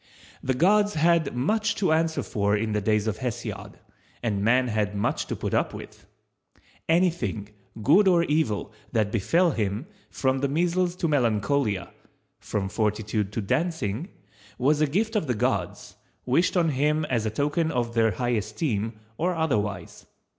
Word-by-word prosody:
The 130 - -1
gods 205 +7 +3
had 160 -3 +2
much 210 - +1
to 185 -5 +1
answer 160 0 +1
for 100 0 0
in 110 +1 -2
the 105 0 0
days 105 0 +1
of 110 -2 -2
Hesiod, 120 -2 -5 0.5
and 100 -4 -1
man 125 +4 +3
had 105 -2 -1
much 100 - -1
to - - -3
put - - -4
up - - 0
with. - - -11 0.8
Anything, 165 - +1 0.3
good 190 - +5
or 175 -2 +5
evil, 145 -10 0 0.2
that 110 -3 +1
befell 165 - +2
him, 105 +1 -2 0.2
from 130 0 0
the 140 - +1
measles 175 +4 0
to 175 - -1
melancholia—from 110 - -2
fortitude 105 -1 -1
to 115 - -1
dancing—was 115 - -2
a 155 - +4
gift 215 +9 -1
of 200 -8 0
the 125 - 0
gods, 105 - -2 0.3
wished 170 +9 +2
on 170 -2 +3
him 150 +2 +1
as 115 -6 -1
a - - +1
token 150 +8 0
of 120 -4 -1
their 115 -1 +3
high 120 +6 -2
esteem, 110 0 -1 0.3
or 180 +2 +1
otherwise. 105 - -2
125 Hz, 155 wpm, -26 LUFS, 105-165 Hz, 0.8 s, good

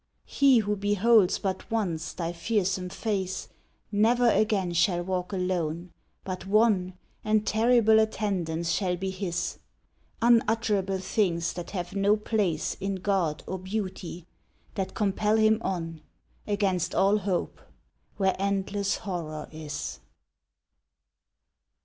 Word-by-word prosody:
He 275 -3 +4
who 210 -2 +1
beholds 205 0 +3
but 190 -1 -4
once 170 -8 -2
thy 170 -1 -3
fearsome 185 0 -1
face, 190 -2 -3 0.4
Never 230 +3 +4
again 200 -5 +1
shall 175 0 +2
walk 180 0 -3
alone! 180 -2 -2 0.3
but 185 0 -5
wan 195 -4 +2 0.3
And 215 0 +2
terrible 220 0 +4
attendants 180 -7 -1
shall 180 0 0
be 190 +1 -3
his 185 -3 -3 0.6
Unutterable 225 -4 +2
things 185 -3 0
that 175 - -6
have 180 -1 -5
no 200 +2 +3
place 205 -7 -1
In 195 0 -2
God 185 -5 -1
or 190 - -4
Beauty 185 -3 -5 0.5
that 195 -2 -4
compel 210 +1 +1
him 220 0 +4
on, 165 -4 -3 0.5
Against 200 -4 0
all 200 +2 +4
hope, 190 -3 -2 0.6
where 190 -2 +2
endless 200 0 0
horror 160 -5 -5
is. 155 -2 -6
195 Hz, 115 wpm, -27 LUFS, 180-210 Hz, 0.6 s, He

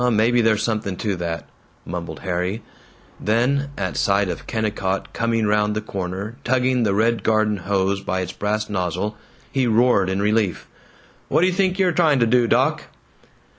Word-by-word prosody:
"Maybe 115 +2 +3
there's 110 -2 +2
something 105 -5 -2
to 105 -3 -1
that," 85 -1 -4 0.4
mumbled 85 -1 -6
Harry; 95 +4 -2 0.6
then, 130 +6 +1
at 95 -2 -3
sight 100 -1 +2
of - - -6
Kennicott 105 -4 -2
coming 115 -1 0
round 105 0 +1
the - - 0
corner 100 +2 -5
tugging 130 0 +1
the 100 -4 +1
red 115 +2 +2
garden 110 -1 +2
hose 100 +1 0
by 95 -1 -2
its 90 -1 -4
brass 105 +2 -2
nozzle, 95 +2 -2 0.4
he 130 -2 +1
roared 115 -4 +3
in 95 +1 -1
relief, 105 -2 0 0.6
"What - - +2
d' - - +5
you 185 - +2
think 185 0 +1
you're 190 -2 +3
trying 160 -4 +3
to 120 - +3
do, 120 +1 +3
doc?" - - +2
105 Hz, 170 wpm, -22 LUFS, 95-120 Hz, 0.6 s, d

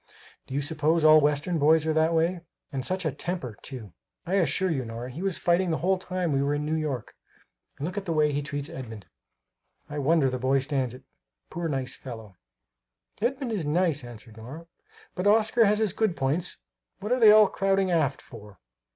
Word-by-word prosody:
Do 135 - -6
you 140 - +1
suppose 155 +2 0
all 155 0 +7
Western 150 +4 0
boys 155 +2 +4
are 160 - +1
that 160 +1 +2
way? 170 +2 +1 0.3
And 135 -2 -3
such 185 +4 -2
a 155 - +1
temper, 135 - -5
too! 115 - -9 0.3
I 180 - -3
assure 190 0 +1
you, 135 -5 -1
Nora, 115 +2 -7
he 150 +8 -7
was 195 -2 -1
fighting 175 +1 +1
the 160 - 0
whole 190 +2 +1
time 185 -2 -2
we 135 - +1
were 140 +1 0
in 150 0 -3
New 155 - -1
York. 150 -7 -3 0.6
And 145 - -4
look 185 +4 -3
at 195 - -12
the 170 - -2
way 150 -2 +2
he 145 0 -1
treats 145 0 -5
Edmund 115 - -8 0.8
I 145 0 -5
wonder 150 0 +3
the 130 -1 -2
boy 130 +2 +2
stands 135 -3 -1
it 130 - -14 0.5
poor 170 0 -3
nice 135 -3 -3
fellow!" 110 -6 -10 0.9
"Edmund 255 +1 -1
is 205 -6 -1
nice," 160 -2 +1
answered 115 -2 -12
Nora, 135 +9 -9 0.5
"but 180 +3 -1
Oscar 220 +2 +4
has 210 +1 +3
his 215 -4 0
good 215 -6 0
points 145 +6 0 0.4
what 210 +4 -5
are 250 - +2
they 220 -3 +8
all 215 -1 +7
crowding 195 -1 +1
aft 155 -5 0
for?" 105 -4 -13
155 Hz, 205 wpm, -26 LUFS, 135-180 Hz, 0.9 s, they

